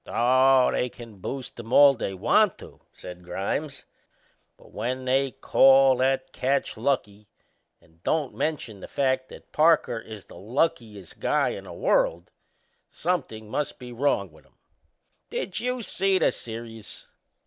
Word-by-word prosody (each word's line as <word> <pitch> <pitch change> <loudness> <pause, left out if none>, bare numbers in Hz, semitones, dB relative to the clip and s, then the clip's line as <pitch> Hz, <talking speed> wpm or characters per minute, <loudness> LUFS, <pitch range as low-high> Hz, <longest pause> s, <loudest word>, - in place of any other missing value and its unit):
"Oh, 130 +2 +4
they 125 - -1
can 115 -3 -13
boost 130 +4 -6
him 115 0 -9
all 140 +1 +7
they 95 -6 -4
want 90 - +3
to," - - -14
said 90 0 -11
Grimes; 115 - -4 0.7
"but - - -19
when 130 +4 -4
they 135 +1 +2
call 135 0 +5
that 135 +1 0
catch 135 +2 -1
lucky 105 -5 -2 0.5
and 80 +1 -27
don't 150 - -1
mention 130 -10 -3
the - - -9
fact 130 -1 -1
that - - -14
Parker 155 -7 +3
is 110 -3 -11
the - - -14
luckiest 110 - -3
guy - - +1
in - - -7
the - - -9
world, 85 +1 0 0.6
somethin' 140 -11 -3
must 145 +6 -3
be 125 -1 -10
wrong 115 - 0
with 75 -2 -21
'em. - - -34 0.7
Did 195 - -4
you 250 +1 -2
see 195 -1 +1
the 180 - +3
serious?" 115 -1 -9
125 Hz, 150 wpm, -25 LUFS, 110-140 Hz, 0.7 s, all